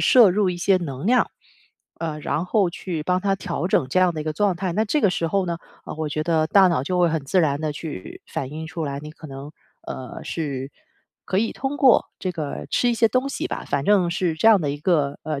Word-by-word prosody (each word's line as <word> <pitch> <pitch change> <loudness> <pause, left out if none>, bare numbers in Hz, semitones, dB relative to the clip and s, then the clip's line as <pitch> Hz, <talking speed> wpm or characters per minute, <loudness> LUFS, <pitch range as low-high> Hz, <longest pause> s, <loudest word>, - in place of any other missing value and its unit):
摄 235 -7 +8
入 200 0 +2
一 175 - -4
些 190 +2 +3
能 145 -5 -5
量。 250 +3 +3 0.7
呃， 160 -2 -3
然 155 +2 -1
后 190 0 +2
去 170 -2 -5
帮 180 +3 0
它 195 -1 +2
调 175 - -3
整 130 - +2
这 160 - +1
样 180 -1 +4
的 155 - -5
一 150 - -5
个 155 -1 -2
状 200 +1 +2
态， 185 +1 -2
那 215 +2 +2
这 300 +8 +1
个 205 - +4
时 175 -2 -1
候 195 +2 0
呢， 170 -1 -2 0.3
啊， - - -6
我 155 -1 -3
觉 155 +1 -1
得 160 -1 +1
大 190 +3 +6
脑 165 -7 +1
就 180 +6 -1
会 175 - +4
很 160 -3 -2
自 180 +6 +2
然 145 -3 +1
地 155 -1 -2
去 145 - -7
反 130 - -4
映 160 +2 -6
出 165 -1 -4
来， 140 -1 -4
你 150 +1 -8
可 155 - -12
能， 135 +1 -8 0.4
呃， 130 -2 -7
是 140 -4 -4 0.5
可 190 - 0
以 225 +2 0
通 275 +2 -4
过 260 -4 +5
这 185 - -3
个 155 -4 -5
吃 245 - +2
一 - - +1
些 225 0 +3
东 255 +4 0
西 - - -3
吧， - - -4
反 140 - -1
正 190 -4 +4
是 170 -2 0
这 160 - 0
样 215 -4 +7
的 145 - -1
一 145 - -3
个， 150 -4 +1
呃， 155 -3 -3
170 Hz, 275 characters per minute, -23 LUFS, 150-195 Hz, 0.7 s, 摄